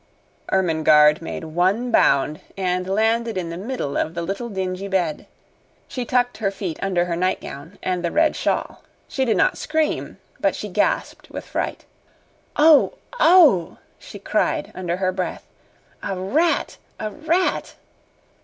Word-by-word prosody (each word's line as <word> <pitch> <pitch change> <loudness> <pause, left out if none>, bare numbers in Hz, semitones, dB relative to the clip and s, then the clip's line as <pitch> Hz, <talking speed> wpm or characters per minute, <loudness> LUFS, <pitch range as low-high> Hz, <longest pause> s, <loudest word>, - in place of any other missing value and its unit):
Ermengarde 155 -4 +4
made 165 - -6
one 185 +10 0
bound, 150 -7 +3 0.2
and 185 -1 -1
landed 225 +2 +1
in 170 -2 -3
the - - -5
middle 195 - -4
of 160 - -1
the 170 - -2
little 200 +7 -4
dingy 190 -1 -3
bed. 180 -6 -1 0.6
She 250 -2 -4
tucked 245 0 +1
her 205 -3 0
feet 190 -4 -5
under 180 -3 +1
her 170 -1 -2
nightgown 170 -2 -3
and 180 -1 -1
the 170 - +1
red 315 - +2
shawl. - - -2 0.3
She 265 - -1
did 230 - +1
not - - +2
scream, 315 0 -1 0.2
but - - +1
she - - -5
gasped - - -1
with - - -7
fright. - - -4 0.7
"Oh! 305 -1 +6 0.3
Oh!" 300 - +5 0.2
she - - -10
cried - - -1
under 175 -1 -3
her 185 -1 0
breath. 185 - -4 0.6
"A 195 - -3
rat! 305 - 0 0.2
A 215 - -3
rat!" 335 - -1
190 Hz, 145 wpm, -22 LUFS, 175-245 Hz, 0.7 s, Oh